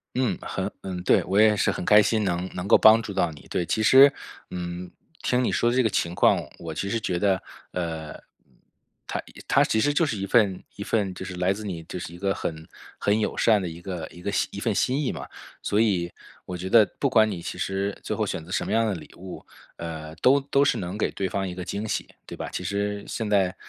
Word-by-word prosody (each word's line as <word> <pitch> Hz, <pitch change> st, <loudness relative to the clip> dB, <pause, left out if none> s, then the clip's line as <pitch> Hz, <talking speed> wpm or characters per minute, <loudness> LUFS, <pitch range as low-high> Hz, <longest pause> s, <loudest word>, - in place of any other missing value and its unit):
嗯， 130 Hz, -2 st, +1 dB
很 -, -, -3 dB
嗯 90 Hz, -2 st, -5 dB
对。 -, -, +4 dB
我 100 Hz, +2 st, +2 dB
也 110 Hz, -1 st, +6 dB
是 -, -, +2 dB
很 -, -, -4 dB
开 105 Hz, 0 st, +7 dB
心 110 Hz, +1 st, +1 dB
能 90 Hz, -1 st, -1 dB
能 90 Hz, +2 st, -4 dB
够 -, -, +8 dB
帮 110 Hz, +1 st, +7 dB
助 100 Hz, -3 st, -6 dB
到 90 Hz, -3 st, +1 dB
你， 70 Hz, -, -14 dB
对。 90 Hz, -, -1 dB
其 110 Hz, +5 st, 0 dB
实， 135 Hz, +5 st, +8 dB, 0.4 s
嗯， 90 Hz, 0 st, -5 dB, 0.3 s
听 125 Hz, 0 st, +1 dB
你 -, -, +1 dB
说 120 Hz, -, +2 dB
的 125 Hz, -, -1 dB
这 130 Hz, -, +5 dB
个 110 Hz, -, +3 dB
情 85 Hz, -4 st, -1 dB
况， -, -, +4 dB, 0.2 s
我 80 Hz, -2 st, -6 dB
其 100 Hz, +5 st, -3 dB
实 115 Hz, -, 0 dB
觉 90 Hz, -4 st, -1 dB
得， 95 Hz, -1 st, +1 dB, 0.3 s
呃， 80 Hz, -3 st, -4 dB
嗯， -, -, -12 dB, 0.9 s
它 -, -, -3 dB, 0.3 s
它 -, -, +5 dB
其 110 Hz, -, +1 dB
实 145 Hz, -, +2 dB
就 165 Hz, -, +3 dB
是 115 Hz, -10 st, -2 dB
一 100 Hz, -, -3 dB
份 100 Hz, -3 st, +3 dB
一 100 Hz, -, -6 dB
份 100 Hz, -4 st, 0 dB
就 95 Hz, -, -7 dB
是 95 Hz, -1 st, -6 dB
来 90 Hz, +1 st, +1 dB
自 105 Hz, +2 st, -8 dB
你 85 Hz, -5 st, -5 dB
就 90 Hz, -, -6 dB
是 85 Hz, -, -7 dB
一 85 Hz, -, -10 dB
个 95 Hz, 0 st, 0 dB
很 80 Hz, -1 st, -5 dB, 0.3 s
很 105 Hz, +2 st, +2 dB
友 -, -, -1 dB
善 110 Hz, -3 st, +4 dB
的 -, -, -3 dB
一 85 Hz, 0 st, -7 dB
个 85 Hz, -3 st, -5 dB
一 85 Hz, -, -14 dB
个 100 Hz, -, -3 dB, 0.2 s
一 -, -, -7 dB
份 -, -, 0 dB
心 130 Hz, +3 st, +1 dB
意 145 Hz, -, -1 dB
嘛。 -, -, -7 dB, 0.4 s
所 105 Hz, -, +1 dB
以 90 Hz, -6 st, +1 dB, 0.3 s
我 90 Hz, -1 st, -6 dB
觉 95 Hz, +2 st, -4 dB
得 110 Hz, +1 st, +7 dB, 0.2 s
不 140 Hz, -, +3 dB
管 110 Hz, -3 st, +4 dB
你 90 Hz, -, -4 dB
其 -, -, -6 dB
实 100 Hz, +1 st, -2 dB
最 -, -, -3 dB
后 -, -, -1 dB
选 80 Hz, -, -4 dB
择 85 Hz, -, -14 dB
什 -, -, 0 dB
么 -, -, -3 dB
样 115 Hz, +1 st, +3 dB
的 105 Hz, -, 0 dB
礼 75 Hz, -4 st, -10 dB
物， 90 Hz, +1 st, -9 dB, 0.3 s
呃， 80 Hz, -2 st, -6 dB
都 130 Hz, -, +5 dB
都 140 Hz, 0 st, +1 dB
是 145 Hz, -, +3 dB
能 90 Hz, +3 st, -4 dB
给 -, -, +1 dB
对 95 Hz, -, -2 dB
方 95 Hz, 0 st, -2 dB
一 90 Hz, -, -5 dB
个 90 Hz, 0 st, -6 dB
惊 105 Hz, +5 st, -4 dB
喜， -, -, -2 dB, 0.2 s
对 -, -, -8 dB
吧？ -, -, -5 dB
其 -, -, -3 dB
实 100 Hz, 0 st, -2 dB
现 110 Hz, -2 st, -3 dB
在， 95 Hz, -3 st, +2 dB
95 Hz, 270 characters per minute, -25 LUFS, 90-110 Hz, 0.9 s, 够